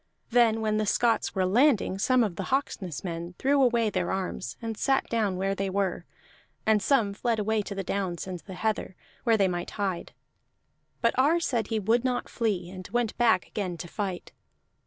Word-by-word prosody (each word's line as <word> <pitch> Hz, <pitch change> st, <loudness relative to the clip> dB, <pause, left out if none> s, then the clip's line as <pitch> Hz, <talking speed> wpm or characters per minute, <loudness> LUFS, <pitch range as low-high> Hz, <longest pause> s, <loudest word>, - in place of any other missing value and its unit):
Then 225 Hz, -2 st, +4 dB
when 215 Hz, -1 st, +1 dB
the 215 Hz, -1 st, 0 dB
Scots 230 Hz, +1 st, +1 dB
were 190 Hz, -1 st, +2 dB
landing, 220 Hz, -2 st, +3 dB
some 255 Hz, +3 st, +4 dB
of 200 Hz, -6 st, -2 dB
the 195 Hz, -, -4 dB
Hawksness 200 Hz, -, -2 dB
men 170 Hz, 0 st, -5 dB
threw 280 Hz, +1 st, +3 dB
away 235 Hz, -4 st, +3 dB
their -, -, -1 dB
arms 185 Hz, -10 st, -3 dB
and 225 Hz, -1 st, -4 dB
sat 270 Hz, +5 st, +1 dB
down 210 Hz, -5 st, 0 dB
where 195 Hz, +1 st, 0 dB
they 195 Hz, 0 st, -2 dB
were; 190 Hz, -3 st, -1 dB, 0.6 s
and 220 Hz, -1 st, +4 dB
some 210 Hz, -2 st, +2 dB
fled 230 Hz, +2 st, 0 dB
away 215 Hz, +1 st, +1 dB
to 200 Hz, 0 st, -6 dB
the 195 Hz, -, -3 dB
downs 185 Hz, -2 st, -2 dB
and 185 Hz, -2 st, -5 dB
the 190 Hz, +2 st, -10 dB
heather, 215 Hz, -2 st, -2 dB, 0.3 s
where 230 Hz, -2 st, +4 dB
they 195 Hz, -2 st, +3 dB
might 175 Hz, -1 st, -3 dB
hide. 195 Hz, -4 st, -3 dB, 0.9 s
But 230 Hz, -2 st, +3 dB
Ar 305 Hz, +6 st, +4 dB
said 240 Hz, -10 st, -1 dB
he 225 Hz, -, -1 dB
would 225 Hz, +4 st, +2 dB
not 250 Hz, -1 st, -1 dB
flee, 200 Hz, -7 st, -1 dB
and 185 Hz, -1 st, -8 dB
went 240 Hz, -2 st, -1 dB
back 225 Hz, -6 st, +4 dB
again 185 Hz, -5 st, -4 dB
to 175 Hz, -, -7 dB
fight. 190 Hz, -1 st, -4 dB
210 Hz, 195 wpm, -27 LUFS, 190-235 Hz, 0.9 s, Then